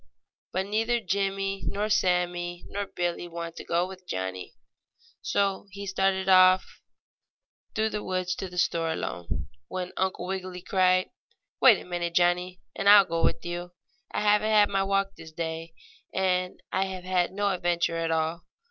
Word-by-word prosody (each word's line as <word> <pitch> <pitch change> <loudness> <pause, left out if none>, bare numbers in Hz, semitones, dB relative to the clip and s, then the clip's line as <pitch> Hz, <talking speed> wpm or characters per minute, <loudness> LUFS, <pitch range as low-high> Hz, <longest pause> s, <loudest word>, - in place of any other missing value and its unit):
But 190 +1 -1
neither 225 +4 +1
Jimmie, 195 -1 -1
nor 205 +1 -1
Sammie 175 -3 0
nor 200 0 -4
Billie 175 -1 -3
wanted 170 -1 -6
to - - -6
go 170 +2 +1
with 185 -1 -12
Johnnie, 95 0 -4 0.7
so 200 0 0
he 200 +1 -8
started 190 0 0
off 185 0 +5 0.9
through 220 0 +1
the 210 - -3
woods 185 -1 -1
to 190 - -4
the 180 - -10
store 165 -2 +1
alone, 85 - -4 0.2
when 180 -1 -5
Uncle 190 -1 -1
Wiggily 185 -1 -5
cried: 185 -1 +2 0.5
"Wait 240 -6 +8
a - - -11
minute, 175 -1 -3
Johnnie, 180 +1 +2
and 200 - +2
I'll 205 -1 +9
go 165 -1 -2
with - - +1
you. 175 0 -5 0.4
I - - -1
haven't 210 +1 +3
had 210 -1 +5
my 195 -1 +1
walk 195 0 0
this 165 -1 -11
day, 165 0 -5 0.4
and 185 -1 0
I 190 - +1
have 190 -1 -6
had 180 -1 +1
no 205 +1 0
adventure 175 -2 0
at 165 0 -1
all. 160 +1 -1
185 Hz, 165 wpm, -27 LUFS, 175-195 Hz, 0.9 s, I'll